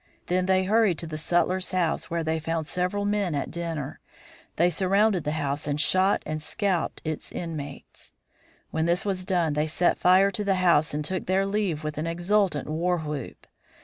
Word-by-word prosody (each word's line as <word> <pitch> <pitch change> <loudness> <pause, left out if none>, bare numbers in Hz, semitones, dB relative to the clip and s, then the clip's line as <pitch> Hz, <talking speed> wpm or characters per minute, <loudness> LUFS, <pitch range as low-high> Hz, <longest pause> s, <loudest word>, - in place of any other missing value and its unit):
Then 180 +1 0
they 190 0 +3
hurried 205 -3 +3
to - - -4
the 160 -1 -6
sutler's 180 +3 +1
house, 180 -3 -1
where 170 0 -1
they 160 0 -1
found 165 0 -2
several 180 +5 -1
men 205 -5 0
at 140 - -3
dinner; 165 -5 -4 0.6
they 170 - +4
surrounded 195 0 +2
the 150 - 0
house 145 -1 -2
and 145 0 -1
shot 185 +5 +3
and 155 0 -3
scalped 185 +2 -1
its 155 -1 -4
inmates. 150 -5 -7 0.6
When 160 +1 0
this 175 +3 +1
was 190 -2 -1
done 175 -5 +1
they 150 +1 0
set 175 +3 +1
fire 190 +2 +5
to 210 0 -3
the 195 -1 +2
house 170 -5 +3
and 150 0 -2
took 185 +2 -3
their 190 +1 +2
leave 195 -6 -1
with 150 -1 -4
an 160 - -2
exultant 175 -2 +1
war 170 +4 0
whoop. 150 -4 -6
175 Hz, 185 wpm, -26 LUFS, 155-190 Hz, 0.6 s, fire